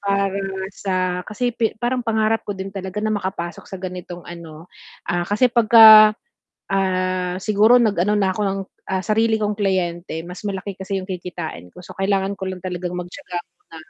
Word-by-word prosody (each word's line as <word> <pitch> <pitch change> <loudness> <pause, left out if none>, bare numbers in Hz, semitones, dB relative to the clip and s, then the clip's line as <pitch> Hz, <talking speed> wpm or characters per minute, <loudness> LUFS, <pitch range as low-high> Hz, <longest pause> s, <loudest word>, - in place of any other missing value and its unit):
para 200 -1 0 0.3
sa 185 -2 -1
kasi 245 +3 -1
pe 230 -1 -1
parang 240 +3 -1
pangarap 225 -1 +1
ko 205 - -3
din 190 0 -6
talaga 195 +2 -5
na 215 - +1
makapasok 190 -4 -4
sa 190 - -6
ganitong 180 -1 -7
ano 165 -2 -10 0.4
ah, 175 +1 -2
kasi 235 +4 +2
'pagka 220 -2 +8 0.5
ah, 185 -1 -1
siguro 215 +4 +4
nag-ano 210 -2 +2
na 190 -2 +1
ako 210 - -5
ng, 195 0 -1 0.3
ah, 190 - +1
sarili 220 +4 +1
kong 210 0 -1
kliyente 175 -4 -2
mas 180 +3 -9
malaki 200 -1 -4
kasi 195 +1 -4
'yong 185 - -7
kikitain 175 - -6
ko. - - -17
So, - - -11
kailangan 195 0 0
ko 190 -1 -5
lang 185 - -6
talagang 180 -1 -4
magtiyaga 180 +1 -6
muna. 165 - -18
195 Hz, 175 wpm, -21 LUFS, 180-215 Hz, 0.5 s, pagka